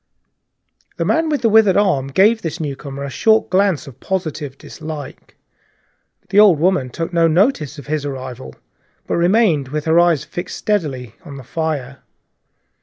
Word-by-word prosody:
The - - -1
man 320 0 +1
with 295 -4 -1
the 230 - +4
withered 215 -3 +5
hand 140 -10 +1
gave 220 +4 +4
the 165 -1 -4
newcomer 140 -2 -5
a 140 - -4
short 220 +8 +2
glance 190 -4 +2
of 135 -3 -13
positive 155 -7 -4
dislike; 155 -3 -9 0.9
the 200 - +3
old 205 -6 +7
woman 165 -5 +1
took 165 +7 -5
no 165 -1 +4
notice 165 - +1
of 140 - -10
his 150 -1 -2
arrival, 130 - -7 0.5
but - - -1
remained 175 - +2
with 150 +2 -4
her 160 +1 +4
eyes 170 -4 +2
fixed 175 - -6
steadily 140 - -2
on 140 -1 -10
the 135 - -10
fire. 140 -2 -4
160 Hz, 160 wpm, -18 LUFS, 140-190 Hz, 0.9 s, old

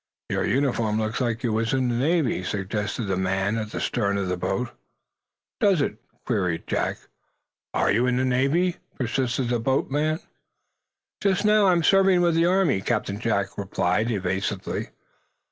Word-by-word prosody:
"Your - - 0
uniform 120 -5 +1
looks 110 +3 -2
like 120 -1 -1
you 115 -3 0
was 115 +2 0
in 130 -1 +1
the 120 - 0
Navy?" 140 - +1
suggested 105 +3 -3
the 95 -2 -1
man 95 +3 0
at 110 -1 -4
the - - -5
stern 100 -4 0
of 95 -2 -2
the 90 - 0
boat. 95 +7 -2 0.9
"Does 195 -5 +3
it?" 135 -7 -1 0.3
queried 90 -8 -1
Jack. - - -1 0.8
"Are - - +2
you 120 +5 +2
in 125 0 +1
the 130 - +1
Navy?" 140 +8 +1 0.2
persisted 125 -1 -1
the 120 -1 +1
boat 130 +4 0
man. 155 +3 0 1.0
"Just 195 0 +1
now, 210 -1 +5
I'm 175 -2 +3
serving 195 +1 +5
with 170 -1 +3
the 165 +1 +3
Army," 185 - +2
Captain 105 -2 -1
Jack 100 -4 -1
replied, 100 +2 0
evasively. 95 -1 -2
120 Hz, 160 wpm, -25 LUFS, 100-145 Hz, 1.0 s, now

